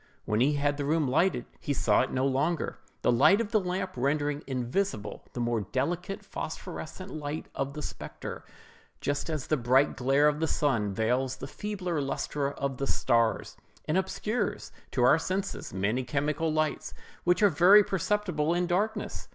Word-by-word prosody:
When 105 - 0
he 145 +4 +4
had 145 0 0
the 145 - -2
room 155 0 +2
lighted, 155 0 +2
he 145 - -2
saw 110 -5 +3
it 130 - -1
no 130 +1 +1
longer, 140 +5 0 0.2
the - - +4
light 155 - +5
of 225 -2 -2
the 215 - +4
lamp 185 0 -2
rendering 145 +3 0
invisible 125 - -2
the - - -5
more 120 -2 0
delicate 165 - -3
phosphorescent 185 +1 -6
light 150 0 -4
of 135 +1 -3
the 150 - -5
spectre: - - -7 0.6
just 145 +3 -2
as 155 -4 -2
the 155 - +1
bright 130 +3 +3
glare 135 +5 +3
of 150 0 +1
the 160 - +1
sun 120 -10 +1
veils 125 +6 0
the - - -7
feebler 185 -7 -3
lustre 140 +1 -2
of 140 -2 -3
the 135 - -2
stars, 115 -1 +1 0.3
and 155 - 0
obscures 205 +3 -1 0.2
to 125 - 0
our 135 +6 +6
senses 190 +4 -3
many 100 +7 0
chemical 150 +4 -1
lights 155 0 -1 0.3
which 180 +4 +3
are 205 - +7
very 185 +6 +7
perceptible 180 -5 0
in 180 0 +1
darkness. 195 +5 -1
145 Hz, 170 wpm, -29 LUFS, 130-180 Hz, 0.6 s, are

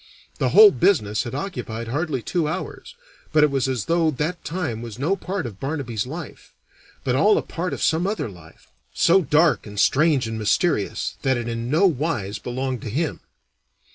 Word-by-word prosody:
The - - +2
whole 430 -2 +9
business 110 - +1
had 120 - -5
occupied 125 - -5
hardly 145 -2 -2
two 170 -4 -1
hours, 190 - -6 0.4
but 155 -1 +4
it 150 - +4
was 135 -2 0
as 125 -5 -2
though 165 -1 +2
that 155 +5 -3
time 155 -10 -3
was 115 -2 -8
no 155 +9 +1
part 190 -3 -4
of 105 -5 -8
Barnaby's 130 -6 -3
life, 160 +1 -9 0.5
but 125 - 0
all 205 +10 +4
a - - 0
part 180 +2 -4
of - - -4
some 165 +3 +2
other 210 - -2
life, 85 -6 -15 0.3
so 190 +3 +4
dark 155 -3 +2
and 105 -1 -6
strange 150 -1 +3
and 115 0 -4
mysterious 110 - 0
that 130 -2 +1
it 120 -1 -4
in 115 0 -3
no 160 +8 +3
wise 125 - -1
belonged 130 +3 -3
to 125 - -6
him. 150 +8 -2
140 Hz, 185 wpm, -23 LUFS, 115-170 Hz, 0.5 s, whole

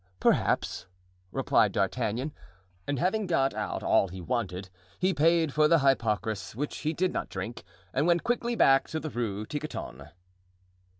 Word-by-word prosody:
"Perhaps," - - +1 0.4
replied - - +2
D'Artagnan. 130 +8 -1 0.5
And 145 - -1
having 195 - 0
got 135 -6 +2
out - - -3
all - - +3
he 95 +1 -8
wanted, 95 -3 -3 0.3
he 185 +1 +1
paid 160 -1 +3
for 155 0 +4
the 165 - +5
hypocras, 110 -7 0
which 145 +5 -3
he 155 - -1
did 185 +3 0
not - - -3
drink, 115 -6 -6 0.3
and 140 +5 +1
went 170 -1 +3
quickly 240 0 0
back 135 -9 +5
to 160 - -2
the 155 -1 -5
Rue 110 -4 -3
Tiquetonne. 150 +5 -6
140 Hz, 155 wpm, -28 LUFS, 110-165 Hz, 0.5 s, the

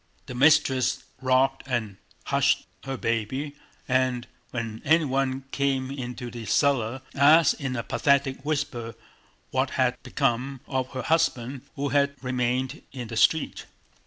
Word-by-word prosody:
The - - -7
mistress 130 -2 +3 0.2
rocked 130 +1 +2
and 115 -6 -2 0.3
hushed - - +2 0.2
her 135 -1 -3
baby 115 +6 -2 0.3
and 130 -1 +1 0.2
when 115 -2 -5
anyone 135 -4 +2
came 135 -1 0
into 125 -2 -6
the 115 -3 -7
cellar 130 +1 +1
asked 155 +4 +5
in 130 -2 -2
a 115 - -2
pathetic 140 -2 +1
whisper 140 -6 -2 0.6
what 130 +1 +1
had 130 -2 +1
become 135 0 -1
of 130 -1 -1
her 130 - -3
husband 135 -5 +1
who 140 +1 -2
had 140 0 +2
remained 125 0 -1
in 125 -4 -7
the 115 - -5
street. 160 +7 +2
130 Hz, 130 wpm, -26 LUFS, 125-140 Hz, 0.6 s, asked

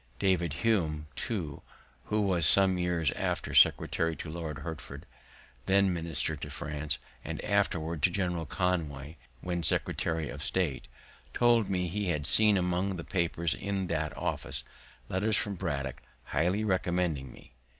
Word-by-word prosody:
David 90 -5 +1
Hume, 80 -9 +1
too, 85 -11 -4 0.4
who 105 0 0
was 90 -6 +3
some 95 0 +5
years 85 -5 +1
after - - -2
secretary 80 -1 +4
to 75 - -7
Lord 80 -3 -5
Hertford, 75 +1 -8 0.6
when 95 -1 +4
minister 85 -2 -1
in 75 - -5
France, 75 0 0 0.3
and - - -5
afterward 85 -6 0
to 90 - +4
General 90 -3 -2
Conway, 80 -6 -2 0.2
when 90 -1 -2
secretary 80 -1 +1
of - - -7
state, 70 -10 -1 0.5
told 120 -3 +3
me 90 -2 0
he 100 +3 -2
had 75 -5 -1
seen 105 +4 +7
among 90 +2 0
the 85 - -6
papers 85 -3 0
in 100 -1 -3
that 80 -1 -2
office, - - -3 0.4
letters 105 +3 +1
from 105 - -1
Braddock 70 -7 -4 0.2
highly 90 +6 0
recommending 90 -8 0
me. - - -17
85 Hz, 140 wpm, -30 LUFS, 80-95 Hz, 0.6 s, seen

